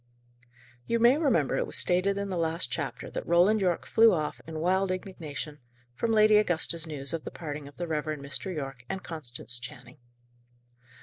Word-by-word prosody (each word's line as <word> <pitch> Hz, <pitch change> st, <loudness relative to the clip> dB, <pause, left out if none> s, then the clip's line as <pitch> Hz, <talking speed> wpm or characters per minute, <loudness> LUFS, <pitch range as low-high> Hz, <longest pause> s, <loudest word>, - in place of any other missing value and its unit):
You 235 Hz, -, +2 dB
may 240 Hz, +3 st, +6 dB
remember 230 Hz, -, +2 dB
it -, -, 0 dB
was -, -, -2 dB
stated 185 Hz, +3 st, +2 dB
in 200 Hz, 0 st, -2 dB
the 185 Hz, -, -2 dB
last 165 Hz, -6 st, 0 dB
chapter 125 Hz, -, -4 dB
that -, -, -5 dB
Roland 180 Hz, +6 st, +4 dB
Yorke 180 Hz, -3 st, +1 dB
flew 225 Hz, -1 st, +6 dB
off, 155 Hz, -2 st, -3 dB
in 160 Hz, -1 st, -6 dB
wild 190 Hz, +3 st, +2 dB
indignation, 160 Hz, -5 st, -5 dB, 0.3 s
from 225 Hz, -, -1 dB
Lady 215 Hz, -1 st, +6 dB
Augusta's 170 Hz, -4 st, +1 dB
news 140 Hz, -2 st, -3 dB
of 165 Hz, -, -3 dB
the -, -, -5 dB
parting 150 Hz, -3 st, -6 dB
of 145 Hz, -, -14 dB
the 175 Hz, -, -2 dB
Reverend 155 Hz, -2 st, -3 dB
Mr. 165 Hz, +7 st, -2 dB
Yorke 135 Hz, -6 st, -5 dB
and 190 Hz, -, -4 dB
Constance 125 Hz, -6 st, -5 dB
Channing. 125 Hz, +2 st, -10 dB
165 Hz, 180 wpm, -28 LUFS, 150-195 Hz, 0.3 s, may